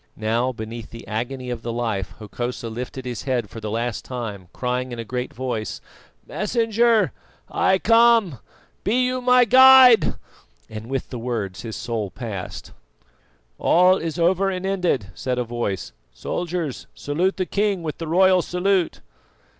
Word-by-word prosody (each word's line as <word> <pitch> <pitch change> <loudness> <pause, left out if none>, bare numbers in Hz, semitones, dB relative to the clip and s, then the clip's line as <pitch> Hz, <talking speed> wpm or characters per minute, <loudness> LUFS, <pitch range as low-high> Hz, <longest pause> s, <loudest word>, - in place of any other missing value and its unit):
Now, 115 +4 0
beneath 115 -1 -7
the 115 - -11
agony 125 +3 -4
of 120 -2 -4
the 115 - -4
knife 115 -5 -3
Hokosa 120 +2 -5
lifted 125 +3 -6
his 120 -4 -4
head 120 -7 -1
for 115 - -8
the 110 -1 -5
last 115 +1 -2
time, 110 -7 -6
crying 125 0 -2
in 120 - -5
a 115 - -5
great 125 +3 -4
voice: 120 -3 -4 0.5
"Messenger, 225 0 +1 0.4
I 190 - +2
come, 230 - +4 0.4
be 250 +5 +2
you 255 0 -1
my 250 0 +5
guide," 260 -1 +7 0.5
and 110 +1 -8
with 135 0 -4
the 125 - -5
words 110 -6 -4
his 110 -2 -6
soul 115 -4 -3
passed. 100 -4 -7 0.9
"All 180 +2 +5
is 165 -2 -4
over 185 +3 +2
and 185 0 -4
ended," 180 - -1
said 125 +7 -3
a 125 - 0
voice. 105 - -4 0.2
"Soldiers, 170 -5 -4
salute 175 +7 -1
the 185 - 0
king 200 -2 0
with 155 -2 -5
the 165 - -5
royal 185 +2 +4
salute." 180 0 0
130 Hz, 155 wpm, -22 LUFS, 115-190 Hz, 0.9 s, guide